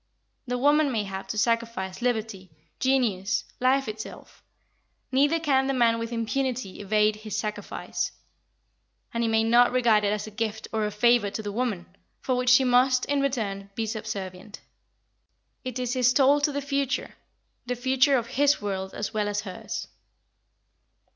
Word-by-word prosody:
The 250 0 -1
woman 290 +2 +3
may 220 -4 0
have 195 -1 -6
to 205 - -4
sacrifice 230 -4 -1
liberty, 220 -6 -2 0.3
genius, 250 -4 +1 0.2
life 265 +1 +2
itself. 215 0 -8 0.7
Neither 290 +5 +3
can 270 -4 +2
the 275 - 0
man 230 -2 +3
with 230 0 -4
impunity 235 -2 -2
evade 210 +1 +2
his 215 0 -5
sacrifice. 210 -1 -3 1.0
And 235 - -1
he 230 - +1
may 220 0 +3
not 240 +2 +5
regard 235 -4 +3
it 200 - +2
as 210 0 -2
a 215 - -9
gift 220 0 -3
or 215 -1 0
a - - -4
favour 225 0 +3
to 215 +2 -5
the 205 - -4
woman, 210 -5 -2 0.3
for 260 - -1
which 250 0 +1
she 255 +1 +7
must, 255 0 +3
in 285 -1 0
return, 205 -8 -2
be 225 - -1
subservient. 210 -3 -6 1.0
It 255 -1 -4
is 250 -1 -2
his 250 -1 +3
toll 280 +2 +4
to 295 - +2
the 285 0 -3
future, 280 -1 -2 0.5
the 250 - -1
future 260 +2 +3
of 235 - -2
his 285 +4 +2
world 190 -2 -4
as 210 - -4
well 210 -1 0
as 205 0 -1
hers. 195 -3 -6
230 Hz, 165 wpm, -26 LUFS, 210-255 Hz, 1.0 s, she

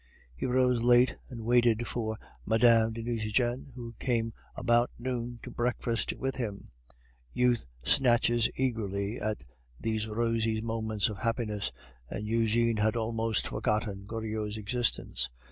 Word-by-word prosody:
He 65 - -2
rose 125 -1 +3
late, 120 +1 +5
and 115 -4 -7
waited 120 -1 +3
for 110 -2 -2 0.3
Mme. 115 0 +5
de 115 0 -5
Nucingen, 120 +3 -1
who 120 -2 -7
came 115 -3 0 0.2
about 120 +1 +3
noon 120 -1 -3
to - - -7
breakfast 120 -1 -1
with 135 0 -3
him. 105 -6 -4 0.7
Youth 125 - +2 0.2
snatches 120 -2 +3
eagerly 110 -4 -1
at 110 0 -2 0.4
these 110 +1 -1
rosy 115 0 0
moments 110 -2 0
of 105 -3 -5
happiness, 110 -3 -1 0.4
and 105 - -4
Eugene 115 +1 +2
had 110 +1 +2
almost 115 -1 0
forgotten 105 -2 -1
Goriot's 110 -1 -3
existence. 115 - -1
115 Hz, 130 wpm, -30 LUFS, 110-120 Hz, 0.7 s, late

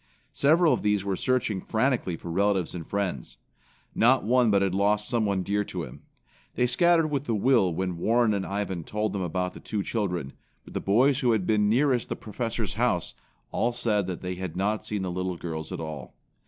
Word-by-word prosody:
Several 160 +3 +4
of - - -1
these 105 -2 +1
were 100 -1 0
searching 115 -4 0
frantically 115 -6 0
for 85 - -7
relatives 95 0 +1
and 85 -3 -7
friends. 95 -10 -3 0.6
Not 130 +3 +4
one 120 +2 +3
but 100 -1 +3
had 95 -2 0
lost 105 +2 +1
someone 105 -5 0
dear 105 +2 0
to - - -5
him. - - -10 0.5
They 125 - +2
scattered 165 +5 +3
with 140 -2 -2
a 115 - +2
will 105 -4 +3
when 90 0 -3
Warren 115 +3 +3
and 100 -2 -1
Ivan 95 -3 -3
told 105 +4 -2
them 100 - -2
about 90 +1 -2
the - - -10
two 105 -2 -3
children, 90 - -2 0.3
but - - -13
the - - -2
boys 125 +7 +3
who 125 -4 +3
had 105 -5 0
been 105 -1 +2
nearest 125 +1 +2
the - - -2
Professor's 115 -1 -4
house, 110 -6 0 0.4
all 120 +1 0
said 105 -5 0
that 90 -2 -5
they 90 0 -2
had 90 -2 -6
not 105 +3 -1
seen 105 -2 -2
the 90 - -2
little 90 0 -3
girls 80 -2 -5
at - - -4
all. 75 -6 -7
105 Hz, 205 wpm, -27 LUFS, 90-120 Hz, 0.6 s, Several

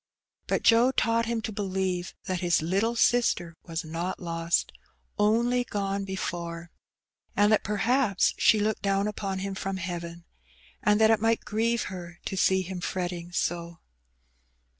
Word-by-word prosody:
But - - 0
Joe 235 +2 +6
taught 230 -3 +1
him 230 -1 -2
to 220 - -3
believe 190 -3 -2
that 185 -1 -2
his 175 -3 +2
little 200 +8 +1
sister 225 -9 +2
was 165 0 -4
not 170 +4 -3
lost, 165 -1 -1 0.5
only 235 +4 +3
gone 200 -3 -2
before, 170 -3 -5 0.6
and 205 +1 +4
that 215 - +3
perhaps 215 0 +2
she 215 - +4
looked 215 +1 0
down 195 0 +1
upon 195 -2 -3
him 195 - -3
from 195 0 -3
heaven, 170 -1 -6 0.6
and 210 0 +3
that 220 0 +6
it 220 - +3
might 225 0 +1
grieve 230 +2 0
her 175 -1 -8
to - - -3
see 190 0 +3
him 185 0 -6
fret 180 0 -2
ting 175 0 -7
so. 170 -1 -2
195 Hz, 155 wpm, -27 LUFS, 175-220 Hz, 0.6 s, Joe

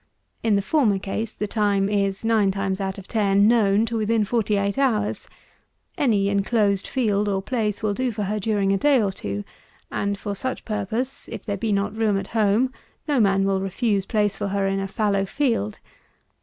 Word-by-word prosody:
In 220 -2 +2
the 200 - +1
former 230 -7 +2
case 210 +3 -4
the 210 - -2
time 205 -2 +1
is, 200 0 -1
nine 220 -3 +3
times 195 0 -2
out 190 -1 -3
of 195 - -10
ten, 200 -2 +3
known 215 -2 +4
to 230 0 -4
within 220 0 +1
forty 215 -1 0
eight 200 +5 -1
hours. 220 -7 0 0.7
Any 210 -8 +2
enclosed 200 0 +1
field 210 -5 0
or 195 -1 0
place 215 -3 -2
will 210 -2 +1
do 255 +3 -1
for 210 -1 -3
her 210 +2 -1
during 200 -1 +1
a 195 - +1
day 285 0 +4
or 205 -3 +1
two; 100 - -5 0.5
and 200 0 -1
for 205 +1 -4
such 255 +6 -4
purpose, 220 +5 -3
if - - -7
there 205 - -2
be 215 +2 -2
not 200 +1 0
room 215 -3 +1
at 195 - -3
home, 225 +4 +2 0.3
no 290 -4 +2
man 195 -3 +3
will 195 -1 +1
refuse 195 +1 -1
place 210 -3 +1
for 205 - -3
her 200 0 0
in 195 0 0
a 195 - -2
fallow 200 0 0
field. 215 - -1
205 Hz, 195 wpm, -23 LUFS, 195-225 Hz, 0.7 s, known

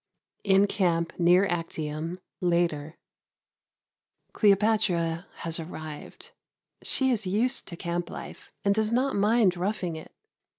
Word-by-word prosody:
In 195 0 +5
Camp 170 -5 0
near 180 +3 +5
Actium, 165 -1 -3 0.2
later. 170 -3 0 1.4
Cleopatra 195 -5 +2
has 165 0 -1
arrived. 155 -2 -8 0.5
She 265 -1 +2
is 215 -5 0
used 235 +8 0
to 170 - -7
camp 175 0 -3
life - - -9
and 200 - +4
does 220 +1 0
not 260 +3 +1
mind 205 -2 +3
roughing 180 -2 -2
it. 160 - -10
180 Hz, 115 wpm, -27 LUFS, 165-210 Hz, 1.4 s, In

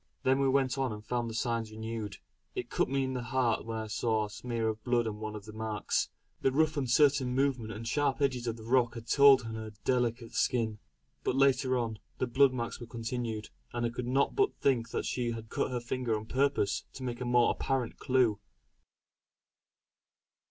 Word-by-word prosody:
Then 130 +1 +3
we 135 -1 +3
went 135 -1 +2
on 130 -3 0
and 105 0 -7
found 120 -1 -1
the 110 - -6
signs 115 -1 -1
renewed. 110 -2 -5 0.4
It - - -4
cut - - +1
me 135 0 +1
to 130 - -3
the 125 - -2
heart 120 -2 0
when 115 -1 -3
I 110 - -3
saw 110 0 0
a 105 - -9
smear 115 0 -2
of 110 0 -3
blood 120 -1 +2
on 105 -1 -4
one 110 0 -5
of 105 -1 -8
the 110 - -9
marks; 110 -1 -1 0.3
the 135 - +3
rough 155 +3 +2
uncertain 135 -1 +3
movement 130 -5 +1
and 110 +1 -7
the - - -4
sharp 145 +2 +1
edges 130 -4 0
of 115 0 -2
the 110 - -10
rock 120 0 +2
had 115 -1 -7
told 140 +2 +7
on 115 0 -5
her 110 -1 -6
delicate 120 -2 0
skin. 110 -4 +1 0.4
But - - 0
later 135 -1 +3
on, 115 -3 -2 0.2
the - - 0
blood 130 +2 +4
marks 120 -2 -4
were 120 - -8
continued, 115 -2 -4 0.2
and 120 0 -1
I - - +1
could 120 +1 -4
not 135 +3 +2
but 405 0 +2
think 125 -4 +1
that - - -2
she 120 -2 -1
had 115 -1 -8
cut - - 0
her 125 -1 -2
fingers 120 -1 -1
on 105 - -7
purpose 130 -5 +1
to 130 - -8
make 120 -1 -4
a - - -2
more 120 0 +4
apparent 130 -3 -2
clue. 125 -5 +2
120 Hz, 210 wpm, -31 LUFS, 110-130 Hz, 0.4 s, told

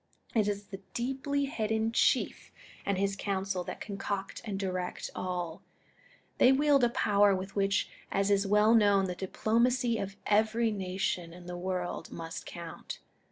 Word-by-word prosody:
It 215 -3 +3
is 205 0 -1
the 200 -1 -9
deeply 270 +3 -1
hidden 220 -3 0
Chief - - +1 0.4
and 200 -1 +1
his 195 +1 +1
Council 195 -2 -2
that - - -6
concoct 195 -1 -4
and 200 -3 -4
direct 185 -2 -3
all. 175 -3 -3 0.8
They 255 - +7
wield 280 -1 +4
a 240 - +5
power 205 -3 +4
with 190 +1 -6
which, 195 0 +2 0.2
as 195 +1 +2
is 200 0 +3
well 210 +2 +5
known, 205 -3 +5
the 180 -1 -3
dii^lomacy 235 +5 +1
of 195 0 -5
every 220 +2 +3
nation 185 -3 -2
in 175 0 -12
the 180 0 -5
world 180 0 -3
must 165 0 -6
count. 170 -2 -7
200 Hz, 155 wpm, -30 LUFS, 185-220 Hz, 0.8 s, They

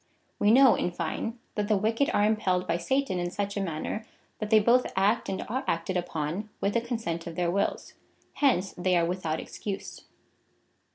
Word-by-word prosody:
We 205 - +4
know, 260 +2 +7
in - - 0
fine, 175 +7 -3 0.2
that 210 -1 -1
the 210 -1 +3
wicked 225 +7 +1
are 205 - +3
impelled 190 -4 +1
by 170 - +1
Satan 265 +2 0
in 175 0 -1
such 200 +2 -3
a 200 - -1
manner, 180 +4 -3 0.4
that 215 - -3
they 220 - +6
both 240 +4 +3
act 200 +4 +2
and 190 - -2
are 260 +5 -2
acted 170 +3 -1
ujjon 175 +2 -2
with 200 - 0
the 235 - +2
consent 225 -9 -3
of 165 - -6
their 175 0 0
wills.^ 200 +2 -1 0.4
Hence 220 -10 +2
they 180 0 +2
are 170 - +3
with 180 0 -3
out 155 0 0
excuse. 200 -2 -6
200 Hz, 190 wpm, -28 LUFS, 175-220 Hz, 0.4 s, know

